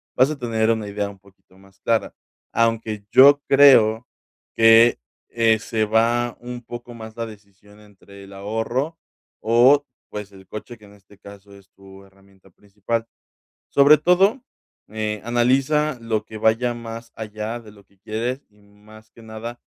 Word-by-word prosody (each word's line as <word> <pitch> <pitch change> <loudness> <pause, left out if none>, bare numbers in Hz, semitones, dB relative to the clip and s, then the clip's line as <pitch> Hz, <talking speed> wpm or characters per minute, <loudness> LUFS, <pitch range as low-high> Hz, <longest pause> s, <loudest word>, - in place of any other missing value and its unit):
vas 130 +2 +4
a 155 - -4
tener 115 -3 -1
una 110 -2 -2
idea 100 0 -3
un 100 - -14
poquito 95 -1 -25
más 95 0 -22
clara. 115 -1 -1 0.4
Aunque 115 -2 -1
yo 140 +2 +7
creo 125 -5 +5 0.5
que, 115 - +6 0.3
eh, 115 -1 +2
se 110 0 -2
va 115 +2 +1
un 120 0 -8
poco 120 0 -10
más 110 -1 -11
la 115 - -4
decisión 105 -1 -16
entre 100 -1 -17
el 100 - -14
ahorro 115 +10 -3 0.4
o, 125 +6 +4 0.2
pues, 105 -1 -8
el 95 -1 -16
coche, 110 +4 -9
que 105 - -18
en 100 - -17
este 100 0 -21
caso 100 0 -15
es 95 -1 -21
tu 95 0 -16
herramienta 95 0 -24
principal. 105 +4 -5 0.6
Sobre 145 +1 +5
todo, 190 - +2 0.5
eh, 105 -1 -4
analiza 130 +4 +1
lo 110 -2 -2
que 110 - -10
vaya 110 +3 +1
más 115 0 -9
allá 110 +1 -6
de 105 -2 -15
lo 100 -1 -19
que 100 0 -33
quieres 120 +6 -4
y, 105 0 -28
más 105 +2 -19
que 115 - -18
nada, 110 +2 -9
110 Hz, 160 wpm, -21 LUFS, 105-120 Hz, 0.6 s, yo